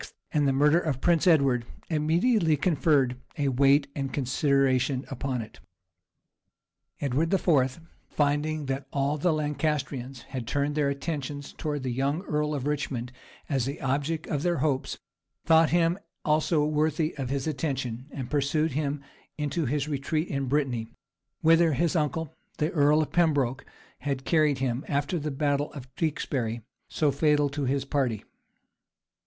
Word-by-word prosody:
and 150 -2 +2
the - - +3
murder 150 +5 +4
of 150 -7 -2
Prince 170 +3 +2
Edward, 140 -8 +4 0.2
immediately 165 +2 +2
conferred 140 -5 +2 0.2
a 140 -2 +1
weight 140 +2 +4
and 135 -2 -3
consideration 135 -1 +1
upon 130 -2 -2
it. 110 - -14 1.4
Edward 145 +4 0
IV., 150 -8 +2 0.3
finding 150 +1 0
that 135 0 -3
all 140 +2 0
the 175 +4 +2
Lancastrians 145 -4 -2
had 130 -4 -6
turned 145 +3 0
their 145 -2 +1
attention 145 0 -4
towards 145 -1 -4
the 130 - -1
young 140 +7 -1
earl 150 -3 -1
of 135 -2 -3
Richmond 135 -4 -2 0.4
as 135 -4 0
the 140 +4 -4
object 145 +4 -1
of 145 - -2
their 175 +1 +1
hopes, 135 -1 -1 0.5
thought 160 -1 +5
him 170 +2 +2 0.3
also 155 0 +2
worthy 155 +1 0
of 135 -3 -3
his 135 -1 -1
attention; 135 -5 -3
and 135 -4 -6
pursued 150 +3 +1
him 145 0 -2 0.3
into 150 +1 -1
his 145 +2 -1
retreat 155 +3 -1
in 140 -1 -2
Brittany, 130 -5 0 0.5
whither 165 0 +5
his 165 +5 +1
uncle, 160 0 -1 0.2
the 150 +3 0
earl 150 0 +4
of - - -7
Pembroke, 145 -6 +1 0.3
had 140 -2 -3
carried 155 -4 +3
him, 130 0 -1
after 145 +4 0
the 150 0 -3
battle 145 0 0
of 130 -3 -10
Tewkesbury, 125 -8 -2 0.2
so 150 -2 +1
fatal 145 0 +2
to 140 0 -3
his 135 +1 0
party. 130 -7 -1
145 Hz, 150 wpm, -27 LUFS, 135-155 Hz, 1.4 s, thought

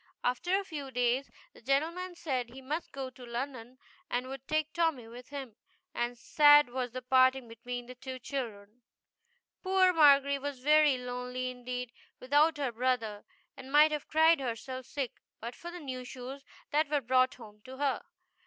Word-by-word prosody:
After 350 +10 +1
a - - -4
few 295 -7 -6
days, 250 +2 0 0.2
the - - -17
gentleman 330 +8 -1
said 260 -8 -2
he 255 +3 -11
must 300 +6 -4
go 270 -2 -5
to 255 - -14
London 245 0 -5 0.3
and 250 +1 -1
would 270 0 -8
take 310 0 0
Tommy 325 -9 0
with 245 +3 -11
him, 270 -6 -7 0.4
and 240 0 -2
sad 295 +2 +6
was 250 0 -2
the 255 +2 -7
parting 260 0 +4
between 245 +2 -6
the 250 - -9
two 255 +1 -7
children. 240 -4 -6 0.8
Poor 375 -1 +4
Margery 280 -3 +5
was 285 0 -4
very 300 +1 +4
lonely 250 0 -4
indeed, 250 -1 -5 0.3
without 295 +4 +3
her 275 -4 -1
brother, 230 -3 -1 0.3
and 270 0 -11
might 300 +2 +6
have 300 -2 -3
cried 320 +1 +5
herself 255 +1 -5
sick 270 -4 -4 0.2
but 235 +2 -6
for 345 - -9
the 355 +1 -8
new 260 -5 -5
shoes 255 +2 -8 0.3
that 300 0 +2
were 295 -1 +2
brought 255 +1 +3
home 210 -3 -14
to 260 0 -9
her. 280 -1 0
260 Hz, 170 wpm, -31 LUFS, 245-290 Hz, 0.8 s, sad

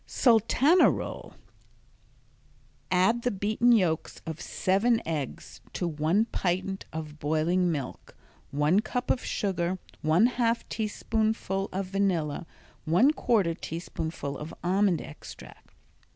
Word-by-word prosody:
Sultana 255 - +4
Roll - - -5 1.5
Add 190 +6 +3
the 245 - +1
beaten 215 +4 +2
yolks 180 -9 +1
of 160 0 -6
seven 225 +5 +1
eggs 150 -5 -5
to 175 - -2
one 165 +7 +1
pint 190 -2 -2
of 155 -1 -7
boiling 165 +4 +1
milk, 140 -5 -6 0.3
one 150 +7 +2
cup 245 +3 -1
of 250 - -1
sugar, 185 -2 -1 0.2
one 160 +8 +4
half 240 -1 0
teaspoonful 215 -2 -1
of 195 +1 -2
vanilla, 180 -5 -1 0.4
one 180 - +4
quarter 205 - +1
teaspoonful 160 -4 -5
of 155 +2 -7
almond 185 -1 +2
extract. 155 - -12
185 Hz, 110 wpm, -28 LUFS, 160-220 Hz, 1.5 s, Sultana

